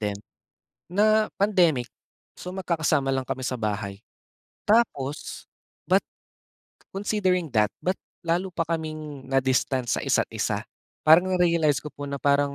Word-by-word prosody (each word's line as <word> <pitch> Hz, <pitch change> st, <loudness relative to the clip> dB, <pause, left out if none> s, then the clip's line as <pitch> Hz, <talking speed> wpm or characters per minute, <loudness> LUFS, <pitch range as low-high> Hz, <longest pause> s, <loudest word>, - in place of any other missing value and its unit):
then, 105 Hz, -2 st, -2 dB, 0.7 s
na 215 Hz, +4 st, +3 dB, 0.2 s
pandemic, 175 Hz, -, +3 dB, 0.5 s
so 180 Hz, -, -7 dB
magkakasama 160 Hz, -6 st, 0 dB
lang 135 Hz, -1 st, 0 dB
kami 130 Hz, 0 st, -4 dB
sa 125 Hz, 0 st, -2 dB
bahay. 100 Hz, -2 st, -3 dB, 0.7 s
Tapos, 155 Hz, -, 0 dB, 0.4 s
but -, -, +4 dB, 0.9 s
considering 190 Hz, -4 st, 0 dB
that, 105 Hz, -3 st, +3 dB, 0.2 s
ba't 185 Hz, +1 st, 0 dB, 0.2 s
lalo 175 Hz, +2 st, -1 dB
pa 165 Hz, -, +1 dB
kaming 155 Hz, -4 st, -5 dB
na-distance 130 Hz, -1 st, +1 dB
sa -, -, -3 dB
isa't -, -, +2 dB
isa. -, -, -1 dB, 0.4 s
Parang 165 Hz, +4 st, +6 dB
na-realize 170 Hz, -5 st, +2 dB
ko 150 Hz, -, -7 dB
po 145 Hz, 0 st, -7 dB
na 140 Hz, 0 st, -3 dB
parang 140 Hz, 0 st, +2 dB
155 Hz, 130 wpm, -25 LUFS, 135-180 Hz, 0.9 s, Parang